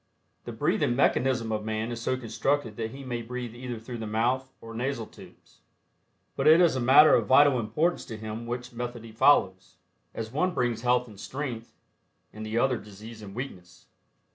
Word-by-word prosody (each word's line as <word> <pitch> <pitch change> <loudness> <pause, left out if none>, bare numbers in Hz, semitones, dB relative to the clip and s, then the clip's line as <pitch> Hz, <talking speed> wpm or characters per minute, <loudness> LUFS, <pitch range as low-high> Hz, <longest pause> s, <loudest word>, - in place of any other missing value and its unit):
The - - -5
breathing 120 - 0
mechanism 125 -3 +1
of 105 -1 -2
Man 110 +1 -3
is 115 -1 -5
so 130 +2 0
constructed 130 0 -1
that 110 0 -3
he 135 +4 -10
may 120 -2 -4
breathe 120 0 -6
either 120 0 -6
through 115 +2 -8
the 110 - -5
mouth 125 +5 0
or 115 0 -10
nasal 120 0 -2
tubes, - - -17 0.8
but - - 0
it 160 +2 +8
is 175 -5 +4
a - - 0
matter 135 +5 +7
of - - +3
vital 135 -1 +6
importance 150 +11 0
to 110 - -7
him 110 +2 -6
which 120 0 -5
method 120 -1 -5
he 115 - -11
follows, 95 -5 +3 0.4
as 110 -1 -5
one 175 +6 0
brings 120 -2 0
health 125 0 +2
and 105 -4 -14
strength 125 -4 -6 0.6
and 110 - -8
the 110 +1 -3
other 125 0 +2
disease 105 +2 -11
and 100 -1 -10
weakness. 95 -9 -8
120 Hz, 190 wpm, -27 LUFS, 110-130 Hz, 0.8 s, it